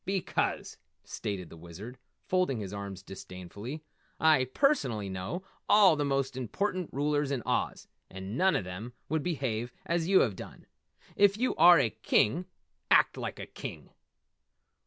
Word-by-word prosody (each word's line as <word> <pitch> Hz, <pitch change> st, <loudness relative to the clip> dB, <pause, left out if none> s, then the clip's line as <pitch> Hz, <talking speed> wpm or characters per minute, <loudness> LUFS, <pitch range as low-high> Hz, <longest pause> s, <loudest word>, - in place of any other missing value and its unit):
"Because," 190 Hz, -1 st, -1 dB, 0.3 s
stated 95 Hz, -5 st, -5 dB
the -, -, -11 dB
Wizard, 95 Hz, +10 st, -10 dB, 0.3 s
folding 180 Hz, -10 st, +1 dB
his 100 Hz, -2 st, -6 dB
arms 100 Hz, -2 st, -6 dB
disdainfully, 95 Hz, -, -8 dB, 0.4 s
"I 155 Hz, -5 st, +5 dB
personally 130 Hz, -, +1 dB
know 95 Hz, -, -4 dB, 0.3 s
all 200 Hz, -5 st, +7 dB
the 150 Hz, -, 0 dB
most 135 Hz, -2 st, 0 dB
important 180 Hz, -, -2 dB
rulers 145 Hz, 0 st, 0 dB
in 135 Hz, -5 st, -2 dB
Oz, -, -, -1 dB, 0.2 s
and 95 Hz, +3 st, -7 dB
none 190 Hz, +6 st, +3 dB
of -, -, 0 dB
them 95 Hz, +7 st, -7 dB, 0.2 s
would 160 Hz, 0 st, 0 dB
behave 130 Hz, -8 st, -2 dB
as 170 Hz, -2 st, 0 dB
you 190 Hz, 0 st, +6 dB
have 105 Hz, -7 st, +1 dB
done. -, -, -10 dB, 0.5 s
If 200 Hz, 0 st, +4 dB
you 255 Hz, +3 st, +1 dB
are 175 Hz, +2 st, +8 dB
a 125 Hz, -7 st, +2 dB
King, 125 Hz, +9 st, +1 dB, 0.4 s
act -, -, +5 dB
like -, -, -5 dB
a -, -, -6 dB
King!" -, -, -9 dB
130 Hz, 150 wpm, -30 LUFS, -, 0.5 s, are